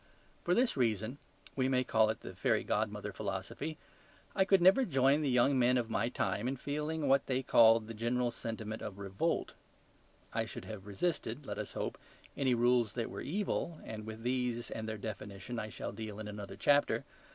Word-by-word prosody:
For 175 - +2
this 250 0 +3
reason 115 +1 0 0.4
(we 130 -1 +1
may 130 -1 +3
call 110 -3 +3
it 110 - -3
the - - -8
fairy - - +1
godmother - - -1
philosophy) 155 -1 -4 0.6
I 190 -1 +3
never 190 +8 +6
could 255 - -1
join 135 +3 +4
the 145 - +1
young 130 +2 +4
men 125 +1 +4
of 115 -2 -1
my 115 +2 +1
time 105 -1 -1
in 135 +1 -1
feeling 150 +2 -2
what 135 0 +4
they 130 0 0
called 115 -2 +6
the 115 - -7
general 120 +2 0
sentiment 110 -1 -5
of 100 -2 -6
REVOLT. 100 -1 -1 0.8
I - - 0
should - - -8
have 105 -2 -8
resisted, 135 - -2
let - - -4
us - - -5
hope, - - -3 0.4
any 130 -3 +2
rules 120 -2 +3
that 115 -2 -3
were - - -5
evil, 170 -1 -2
and 110 -1 -7
with 110 0 -7
these 125 -1 -1
and 110 0 -4
their 110 - -3
definition 105 +2 -6
I 110 - -4
shall 90 - -5
deal 110 -2 -6
in 110 - -5
another 105 -1 -7
chapter. 145 0 +3
120 Hz, 190 wpm, -33 LUFS, 110-135 Hz, 0.8 s, never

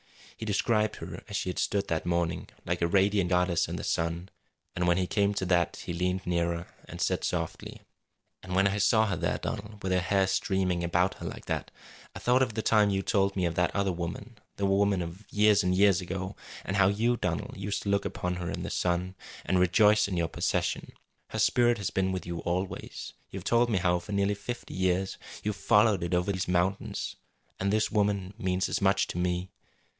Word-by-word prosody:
He 110 - -6
described 105 +1 +1
her - - -8
as - - -6
she - - -2
had 90 - -3
stood 100 0 0
that 80 +1 -2
morning, 85 0 -1 0.2
like 90 0 -1
a 85 - +3
radiant 100 0 +2
goddess 90 -2 +2
in - - -4
the - - -5
sun; 85 +2 -1 0.5
and 90 0 0
when 85 0 +4
he 95 - +1
came 100 +2 +1
to 95 - -1
that 90 -2 +2
he - - -3
leaned 90 +2 -1
nearer, 85 -1 0 0.2
and - - -9
said - - 0
softly: - - -4 0.6
"And 90 0 -5
when 95 +1 +4
I 100 +1 0
saw 110 +2 +4
her 100 -4 -1
there, - - -1
Donald, 105 0 -6
with 95 - -1
her 90 - +3
hair 95 +2 +2
streaming 95 -2 0
about 90 +2 +2
her - - -5
like - - -7
that, - - -3 0.5
I - - -6
thought 125 +2 +3
of 115 -5 0
the 110 - -1
time 105 -2 +4
you 95 -1 0
told 100 -1 +1
me 95 -2 +1
of 85 - 0
that 90 +1 0
other 100 -1 +1
woman 90 +7 -6 0.2
the 100 - -1
woman 100 -1 +2
of 85 +5 -10
years 105 -1 +4
and 90 0 +1
years 100 -2 +4
ago 95 +2 -4 0.3
and 95 - -1
how 95 -1 +5
you, 115 +5 +2
Donald, 85 -5 -2
used 100 +1 -3
to 100 - -3
look 100 0 +2
upon 90 0 -3
her 85 -1 -4
in - - -4
the - - -4
sun, 90 +1 0 0.3
and 95 - +2
rejoice 105 +4 +5
in 95 -3 -3
your 85 -1 +1
possession. - - -1 0.3
Her - - -6
spirit 120 -1 +4
has 100 - -3
been 95 0 0
with 95 -1 -3
you 85 -1 -4
always. 90 +3 -4 0.2
You - - -7
have - - -7
told 120 +1 +3
me 110 - +2
how 90 -1 +2
for 100 +4 -8
nearly 100 0 +2
fifty 120 +4 -6
years 95 +1 0 0.2
you 105 - 0
have 105 - -2
followed 105 -2 +4
it 85 +1 0
over 90 +3 +1
these 95 -2 -2
mountains. 90 +2 -1 0.4
And 100 +1 0
this 110 +1 +1
woman 100 -2 0
means 95 -3 0
as - - -2
much 95 0 +3
to 90 - -3
me. 90 +1 -1
95 Hz, 220 wpm, -29 LUFS, 90-100 Hz, 0.6 s, how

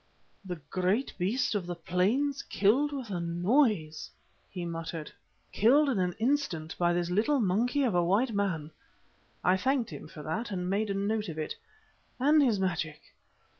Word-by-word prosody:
"The 180 -2 -4 0.2
great 190 +8 0
beast 210 +10 +1
of 195 -4 -2
the 175 - -3
plains 215 - 0
killed 255 +9 +2
with 260 -7 -5
a 180 - -2
noise!" 175 - +1 0.4
he 180 -2 -5
muttered. 165 -2 -5 0.4
"Killed 275 +7 +4
in 240 -7 0
an 180 -1 0
instant 225 - -1
by 175 -1 +3
this 175 0 -1
little 230 +10 +2
monkey 235 +7 +1
of 240 -6 +1
a 175 -1 +3
white 215 +8 +2
man" 180 -7 -1 0.7
(I 180 +2 +4
thanked 255 +2 0
him 145 - -8
for 150 0 -10
that 215 +10 -3
and 180 -3 -3
made 205 +3 0
a 200 - -1
note 210 +1 -1
of 160 - -6
it) 155 - -3 0.7
"and 295 +4 +5
his 235 -8 +3
magic. 170 -5 -2
195 Hz, 170 wpm, -29 LUFS, 175-245 Hz, 0.7 s, and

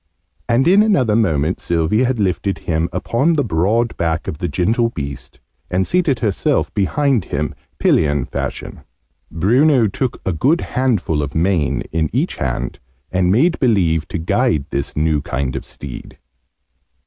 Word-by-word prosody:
And 125 +5 +3
in 195 +4 +6
another 135 - +2
moment 85 -7 +1
Sylvie 85 +8 +1
had 125 -2 -1
lifted 95 0 0
him 80 +1 0
upon 120 - +1
the 145 - +1
broad 110 +5 +1
back 80 -1 -1
of 75 - -5
the 90 - -1
gentle 115 +7 +1
beast, 70 -9 -7 0.3
and 95 +1 +1
seated 165 -9 +1
herself 105 -4 0
behind 130 - +1
him, - - -2 0.2
pillion 75 -4 +2
fashion. - - -5 0.5
Bruno 120 - +3
took 115 +5 -2
a 95 - 0
good 140 - +2
handful 110 - 0
of 70 0 -5
mane 85 -2 +1
in 80 -1 0
each - - -1
hand, 65 -2 -3 0.3
and 90 -1 +2
made 160 - +3
believe 90 - +2
to - - -4
guide 80 -3 +1
this 70 +1 -3
new 75 -1 +1
kind 70 -1 -3
of - - -4
steed. 65 -4 -9
95 Hz, 150 wpm, -18 LUFS, 80-120 Hz, 0.5 s, in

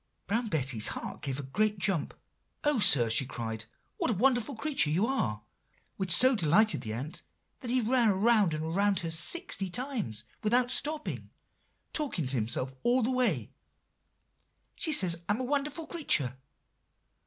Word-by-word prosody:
"Brown 230 +3 -2
Betty's 135 - +2
heart - - -6
gave 135 -2 -4
a - - -5
great 210 +10 -1
jump. 185 -5 -1 0.5
'Oh, 295 -4 +1
sir!' 130 - +7
she 115 +4 +3
cried, 110 -3 -6 0.3
'what - - -1
a 225 - 0
wonderful 245 +4 +1
creature 270 - 0
you 175 +8 +1
are!' 105 - -2 0.5
which 190 -2 -3
so 255 +9 +7
delighted 210 +4 +2
the 110 - -6
ant, 130 +8 -4 0.4
that 250 - -7
he 255 +1 +1
ran 235 0 +2
round 205 -3 +2
and 160 +2 -4
round 200 -1 +1
her 165 -1 -4
sixty 195 - 0
times 220 - -3 0.2
without 245 +3 +2
stopping, 300 +3 -3 0.6
talking 275 - -1
to 130 +1 -2
himself 125 +3 -2
all 245 +1 +1
the 245 - 0
while; 220 - 0 1.3
'She 315 - -2
says 175 - +5
I'm 210 +3 0
a - - -3
wonderful 290 +4 -2
creature. 155 - 0
205 Hz, 155 wpm, -29 LUFS, -, 1.3 s, sir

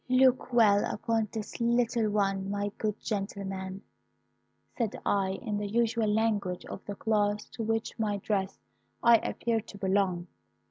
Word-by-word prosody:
"'Look 255 0 +4
well 215 -4 +5
upon 225 0 0
this 220 +1 -6
little 235 -1 +2
one, 195 -2 0
my 205 0 -1
good 215 -1 -1
gentleman,' 195 -2 -4 0.9
said 230 -5 -1
I, 195 -1 +1
in 210 -4 -2
the 205 - -2
usual 230 0 +1
language 210 -4 0
of - - -8
the 205 - -5
class 210 -1 +1
to - - -7
which 225 0 -1
by - - +2
my - - -1
dress 195 -1 -1 0.5
I 235 -1 +8
appeared 225 0 -2
to 205 - -10
belong. 190 -3 +1
210 Hz, 150 wpm, -29 LUFS, 200-225 Hz, 0.9 s, I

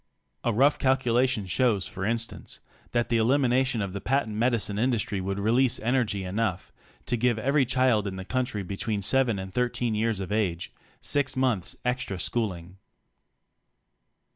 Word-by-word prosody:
A 120 - +1
rough 135 +7 +3
calculation 130 -3 +2
shows 100 0 +1
for 95 - -6
instance 115 +1 -3 0.3
that 120 -1 0
the 120 - +2
elimination 125 0 +2
of 95 -2 -5
the 100 - -5
patent 130 -4 0
medicine 110 -3 0
industry 110 -5 0
would 95 +1 -3
release 115 +5 +2
energy 115 -5 0
enough 95 0 -2 0.3
to 120 - 0
give 120 0 +1
every 140 +4 +2
child 125 -5 +2
in 95 - -4
the 95 0 -7
country 125 -4 -2
between 100 +2 -3
7 125 0 +2
and 95 0 -7
13 120 -1 0
years 110 -1 0
of 95 0 -5
age, 95 -5 -1 0.3
six 145 -2 +1
months 125 -8 0
extra 125 -7 -2
schooling. 95 -5 -3
115 Hz, 150 wpm, -27 LUFS, 100-125 Hz, 0.3 s, rough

